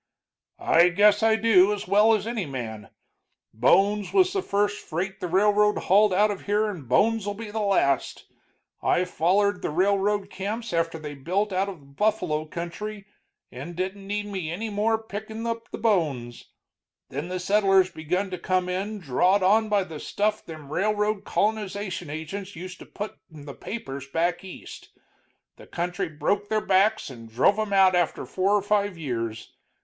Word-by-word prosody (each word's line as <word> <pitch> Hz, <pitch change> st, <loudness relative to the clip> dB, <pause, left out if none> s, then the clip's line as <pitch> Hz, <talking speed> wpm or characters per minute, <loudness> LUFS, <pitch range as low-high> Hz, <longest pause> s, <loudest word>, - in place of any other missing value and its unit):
"I 170 Hz, +2 st, +4 dB
guess 205 Hz, +3 st, +4 dB
I 220 Hz, 0 st, +4 dB
do, 210 Hz, -3 st, +5 dB
as 205 Hz, -3 st, -4 dB
well 210 Hz, +4 st, +5 dB
as 205 Hz, -1 st, -3 dB
any 225 Hz, -6 st, -3 dB
man. 110 Hz, -6 st, -6 dB, 0.6 s
Bones 200 Hz, -, +3 dB
was 375 Hz, -1 st, +3 dB
the 390 Hz, -, 0 dB
first 205 Hz, -, -1 dB
freight 190 Hz, +4 st, -4 dB
the 180 Hz, -, -3 dB
railroad 210 Hz, +3 st, +3 dB
hauled 205 Hz, +2 st, +4 dB
out 205 Hz, +3 st, +3 dB
of 200 Hz, -, -7 dB
here, 210 Hz, +1 st, +2 dB
and 150 Hz, -, -10 dB
bones'll 205 Hz, -, +2 dB
be 215 Hz, 0 st, -7 dB
the 220 Hz, -, -3 dB
last. 195 Hz, -10 st, +1 dB, 0.6 s
I 180 Hz, -, +2 dB
follered 185 Hz, +3 st, +1 dB
the -, -, -2 dB
railroad 200 Hz, +4 st, +1 dB
camps 215 Hz, +3 st, -4 dB
after 165 Hz, 0 st, 0 dB
they 150 Hz, -2 st, -7 dB
built 185 Hz, +9 st, -1 dB
out 190 Hz, +2 st, 0 dB
of 185 Hz, -4 st, -8 dB
the -, -, -19 dB
buffalo 155 Hz, 0 st, -1 dB
country 195 Hz, +6 st, -6 dB, 0.5 s
and 140 Hz, +8 st, -8 dB
didn't 190 Hz, +2 st, -4 dB
need 205 Hz, +1 st, -2 dB
me 190 Hz, -6 st, -4 dB
any 215 Hz, +6 st, -4 dB
more, 215 Hz, +2 st, +1 dB
pickin' 220 Hz, +1 st, -7 dB
up 230 Hz, 0 st, -4 dB
the -, -, -6 dB
bones. 150 Hz, -, -1 dB, 0.6 s
Then 145 Hz, +5 st, -4 dB
the 185 Hz, 0 st, -3 dB
settlers 195 Hz, -1 st, +3 dB
begun 180 Hz, +5 st, -2 dB
to 180 Hz, -, -4 dB
come 185 Hz, 0 st, 0 dB
in, 195 Hz, +4 st, -3 dB
drawed 185 Hz, +4 st, +2 dB
on 215 Hz, +3 st, +3 dB
by 205 Hz, -2 st, +2 dB
the 160 Hz, -4 st, -8 dB
stuff 210 Hz, +6 st, -1 dB
them 155 Hz, -3 st, -10 dB
railroad 210 Hz, +1 st, 0 dB
colonization 200 Hz, -5 st, -2 dB
agents 175 Hz, +6 st, -6 dB
used 180 Hz, +2 st, -8 dB
to -, -, -12 dB
put 210 Hz, +1 st, -7 dB
in 150 Hz, -2 st, -12 dB
the 140 Hz, -, -7 dB
papers 140 Hz, -, -7 dB
back 170 Hz, +5 st, 0 dB
East. 190 Hz, -, -10 dB, 0.7 s
The -, -, -14 dB
country 180 Hz, +1 st, -3 dB
broke 200 Hz, +7 st, -1 dB
their 215 Hz, -1 st, 0 dB
backs 195 Hz, -2 st, +2 dB
and 115 Hz, -3 st, -11 dB
drove 135 Hz, -, +3 dB
'em 215 Hz, -1 st, -2 dB
out 190 Hz, -1 st, +5 dB
after 175 Hz, -2 st, 0 dB
four 195 Hz, +2 st, +1 dB
or 205 Hz, -, +1 dB
five 205 Hz, -2 st, 0 dB
years. 115 Hz, -7 st, -4 dB
195 Hz, 175 wpm, -25 LUFS, 170-210 Hz, 0.7 s, do